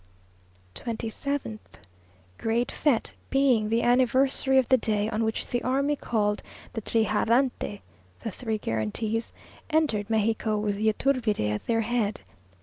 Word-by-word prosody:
27th. 230 - -3 0.8
Great 230 +2 0
fête; 275 -7 +1 0.2
being 255 -6 +3
the 230 +1 +2
anniversary 260 +2 +3
of 260 -3 +4
the 260 - +6
day 210 -2 0
on 225 0 0
which 220 0 -2
the 245 - -1
army 275 +3 +1
called 210 -6 0 0.3
the 225 - -3
trigarante 225 +1 +1 0.4
(the 225 - -4
three 220 +2 -3
guarantees) 210 - -2 0.4
entered 280 -10 +1
Mexico 220 0 +1
with 210 -1 -1
Yturbide 220 - +1
at 105 - -5
their 225 -1 +2
head. 220 -2 -1
225 Hz, 125 wpm, -27 LUFS, 215-255 Hz, 0.8 s, the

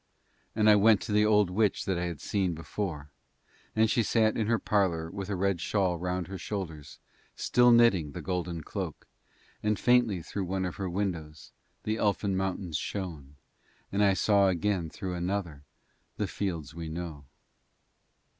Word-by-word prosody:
And 110 -1 +3
I 105 - +8
went 105 0 +5
to 110 - -5
the 105 0 +4
old 105 -3 +4
witch 105 +1 +1
that 95 -3 0
I 90 - -1
had 85 -4 -4
seen 95 -4 0
before 80 -3 -5 0.6
and 110 0 +4
she 115 +2 +2
sat 110 0 +2
in 110 - 0
her 115 0 +3
parlour 85 -7 0
with 100 -1 -5
a 100 - -1
red 95 -1 0
shawl 90 -3 0
round 90 0 -2
her 95 +1 -7
shoulders 80 -7 -6 0.4
still 120 +1 +4
knitting 115 -11 +4
the - - -6
golden 90 -3 -3
cloak, - - -5 0.6
and 105 -1 +1
faintly 120 -8 +3
through 100 +2 -4
one 95 +1 -1
of 90 - -5
her 95 -2 -3
windows 80 -8 -4 0.3
the 110 +1 -1
elfin 100 -2 +1
mountains 95 -4 -2
shone 80 -7 -5 0.6
and 100 +1 +2
I 100 -2 +4
saw 100 0 +4
again 90 -1 0
through 90 +3 -5
another 90 -4 -3 0.6
the - - 0
fields 85 -7 -4
we 80 -1 -6
know. 80 -3 -6
95 Hz, 165 wpm, -29 LUFS, 85-105 Hz, 0.6 s, I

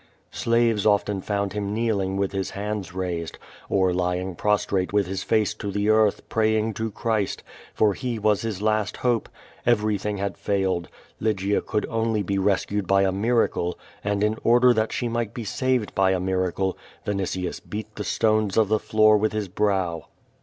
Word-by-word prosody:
Slaves 115 -3 +2
often 105 -2 +2
found 100 -1 -2
him 105 0 -2
kneeling 100 -4 0
with 100 -1 0
his 95 -1 -2
hands 105 -1 -4
raised, 90 -3 -4 0.3
or 95 -2 +2
lying 90 +1 -1
prostrate 100 -1 0
with 100 -1 +2
his 95 +1 -4
face 110 -1 +1
to 105 -1 -5
the 105 +1 0
earth, 110 -1 +3
praying 110 0 +1
to 110 +2 -3
Christ, 110 -1 -1 0.3
for 105 -2 +3
He 120 +2 -3
was 105 -1 +2
his 105 -3 -4
last 110 -2 +1
ho]>e. 120 -3 0 0.4
Everything 105 -3 +1
had 100 0 -3
failed. 95 -4 0 0.3
Lygia 105 -2 0
could 105 - -2
only 115 -2 0
be 100 +1 -1
rescued 100 0 0
by 100 0 +4
a 95 - +2
miracle, 100 -4 +1 0.3
and 100 0 0
in 110 +1 +1
order 120 +1 +5
that 110 -1 0
she 120 - -1
might 115 -2 -2
be 120 - -4
saved 130 +1 0
by 95 -1 +3
a 95 - 0
mira 95 0 0
cle, 95 0 -1 0.3
Vinitius 95 -3 -2
beat 110 0 -7
the 105 - -4
stones 110 -2 +1
of 110 -3 +4
the 110 0 +3
floor 110 0 +4
with 110 +1 0
his 105 -2 -2
brow. 95 -4 0
105 Hz, 175 wpm, -24 LUFS, 95-110 Hz, 0.4 s, order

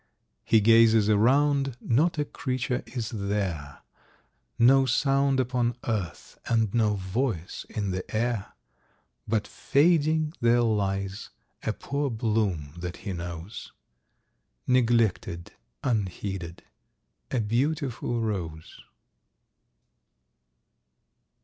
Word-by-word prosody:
He 110 - +4
gazes 115 -1 +5
around, 135 +4 +3
not 155 +8 +1
a 150 - 0
creature 130 -2 -2
is 120 -3 -4
there, 100 - -3 0.7
No 135 +3 +5
sound 135 0 +2
upon 125 -1 0
earth, 100 -8 -4
and 110 -3 +1
no 110 -3 +2
voice 95 -1 -3
in 100 -3 -2
the 90 0 -3
air; 115 -2 -1 0.7
But 110 -1 0
fading 155 0 +2
there 120 +1 +4
lies 100 -2 -1 0.3
a - - -1
poor 140 0 -2
bloom 105 - -1
that 90 0 -5
he 100 - -2
knows, 85 +2 -7 0.9
Neglected, 115 -8 +1 0.3
unheeded—a 95 +1 -5
beautiful 120 +1 -1
Rose. 85 -8 -4
115 Hz, 90 wpm, -27 LUFS, 95-130 Hz, 0.9 s, gazes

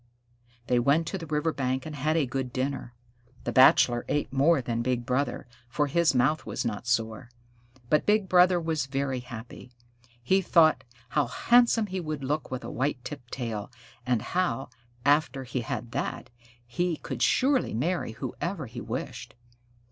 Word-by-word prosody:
They 125 -1 +2
went 140 +7 +3
to 190 - -4
the 165 - -8
river 150 +1 0
bank 130 -1 -2
and 155 -1 -6
had 155 +3 0
a 155 - +2
good 130 0 -3
dinner. 130 -2 -3 0.5
The - - -2
Bachelor 125 -2 +5
ate 145 -3 -1
more 145 +4 +4
than 120 -2 -2
Big 120 0 -1
Brother, 130 +4 -1 0.2
for 145 +4 +1
his 160 +1 +2
mouth 135 +5 +2
was - - -4
not 115 0 -3
sore. 115 0 -1 0.6
But 150 +4 +2
Big 210 -2 +3
Brother 180 0 +5
was 160 -4 -2
very 135 -1 -2
happy. 120 0 -10 0.5
He 190 +10 +3
thought 165 -3 +4 0.3
how 145 -4 +1
handsome 235 - +4
he 190 -2 -4
would 155 -4 -4
look 150 +3 -2
with 130 -1 -5
a - - -6
white 130 0 -2
tipped 130 -5 -8
tail, 115 -5 -4 0.3
and 120 -3 0
how, 175 -7 -1 0.4
after 145 -2 +2
he 130 0 -3
had 115 0 -5
that, 125 - -4 0.3
he 165 +8 -1
could - - -6
surely 260 - +2
marry 160 -1 -1
whoever 170 - -4
he 120 0 -8
wished. 120 +1 -6
135 Hz, 165 wpm, -27 LUFS, 125-160 Hz, 0.6 s, Bachelor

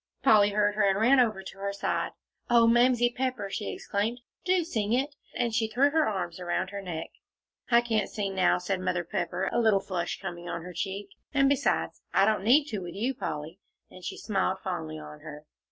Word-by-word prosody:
Polly 210 -5 +6
heard 205 0 +2
her, 215 - 0
and 195 +1 +1
ran 255 +5 +5
over 215 -6 +2
to 190 - -10
her 200 0 -2
side. 200 0 -2 0.4
"Oh, 235 -1 +6
Mamsie 240 +1 +4
Pepper!" 250 -6 -2
she 210 - -3
exclaimed, 220 +4 -2 0.2
"do 365 -1 +2
sing 220 -10 -1
it," 275 +4 0 0.2
and 235 -2 0
she 225 -1 +1
threw 270 +6 +3
her 315 0 +3
arms 180 -4 -3
around 180 +1 -2
her 200 0 -5
neck. 170 -4 -5 0.6
"I 235 -1 +6
can't 220 -4 0
sing 200 -3 -3
now," 185 -1 +3
said 185 +1 -2
Mother 180 -1 -1
Pepper, 175 +2 -2
a - - +2
little 220 -4 +4
flush 185 -3 -3
coming 175 -2 -6
on 170 - -4
her 180 +1 -8
cheek, 195 +3 -4 0.3
"and 275 -1 +5
besides, 280 0 0
I - - +6
don't 215 -3 +1
need 270 +7 +5
to, 215 - -3
with 175 -2 -7
you, 240 +7 -1
Polly," 160 - -5 0.3
and 185 - -13
she - - -5
smiled 190 -3 0
fondly 160 -5 -4
on 150 0 -10
her. 150 0 -10
205 Hz, 205 wpm, -28 LUFS, 180-240 Hz, 0.6 s, Polly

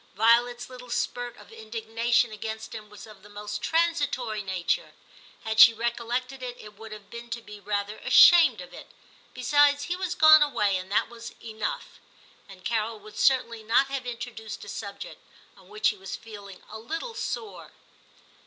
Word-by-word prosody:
Violet's 240 +3 +3
little 250 -1 -12
spurt 245 0 -3
of 210 - -15
indigna 225 +1 -5
tion 240 -1 +4
against 220 +1 -6
him 215 -2 -9
was 210 - -12
of 215 -2 -15
the 210 - -16
most 210 0 -6
transitory 290 -10 0
nature; 190 - -2 0.5
had 220 0 -2
she 230 -1 +9
recollected 240 +3 -3
it, 245 -1 -6
it 210 0 -12
would 220 +1 -12
have 210 -1 -11
been 235 0 -9
to 235 0 -4
be 210 -2 -12
rather 205 +1 -3
ashamed 345 -2 +7
of - - -12
it; - - -11 0.5
besides, 285 +3 +3
he 350 - -2
was 365 -1 -3
gone 310 -2 +8
away, 210 -9 +2
and 185 +1 -5
that 205 - +2
was 235 0 -10
enough; 220 -2 -5 0.5
and 185 -2 -14
Carol 225 -1 -1
would 210 +1 -11
certainly 235 -4 +2
not 235 +5 +2
have 270 -2 -4
introduced 230 -3 -7
a - - -10
subject 215 - -8 0.3
on - - -20
which 425 0 +1
he 210 - -5
was 190 -1 -7
feeling 205 -4 -12
a 220 - -7
little 325 - -5
sore. 445 -1 -6
230 Hz, 175 wpm, -26 LUFS, 210-255 Hz, 0.5 s, she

